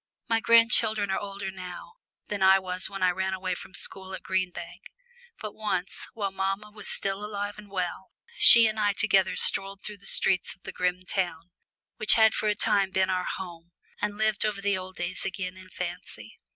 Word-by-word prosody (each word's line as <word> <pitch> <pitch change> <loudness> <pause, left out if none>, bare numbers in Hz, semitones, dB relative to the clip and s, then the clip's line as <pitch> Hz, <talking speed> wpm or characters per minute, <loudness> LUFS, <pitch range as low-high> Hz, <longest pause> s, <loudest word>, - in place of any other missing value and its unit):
My 225 -1 +2
grandchildren 225 -3 +3
are - - 0
older 200 -1 -6
now 180 - -9 0.3
than 205 -1 -5
I 190 0 +6
was 185 -1 +2
when 195 -1 -5
I 180 - +4
ran 190 +1 -2
away 185 0 -3
from 180 - -10
the - - 0
school 190 0 -2
at - - -11
Green 190 -1 -1
Bank. 175 -1 -10 0.5
But 215 -1 -7
once, 200 -4 -4
while 200 -3 -3
mamma 195 +2 -3
was 210 -2 -8
still 195 +1 -2
alive 205 0 -5
and 210 -1 -13
well, 185 0 -4 0.2
she 235 - +10
and 215 0 -1
I 205 -1 +2
together 195 -2 +2
strolled 195 0 +1
through 210 -1 -7
the - - -13
streets 185 -2 +2
of 190 - -38
the - - -7
grim 180 0 -2
town, 175 -3 -3 0.5
which 215 - +3
had 220 -1 +5
for 215 - 0
a 210 - +1
time 200 -2 +2
been 190 0 0
our 185 -1 -1
home, 175 -2 -10 0.3
and 205 0 -2
lived 215 -1 0
over 210 -2 -2
the 200 0 0
old 185 0 -7
days 175 +1 -4
again 185 -1 -4
in 185 0 -14
fancy. 175 - -8
195 Hz, 205 wpm, -27 LUFS, 185-210 Hz, 0.5 s, she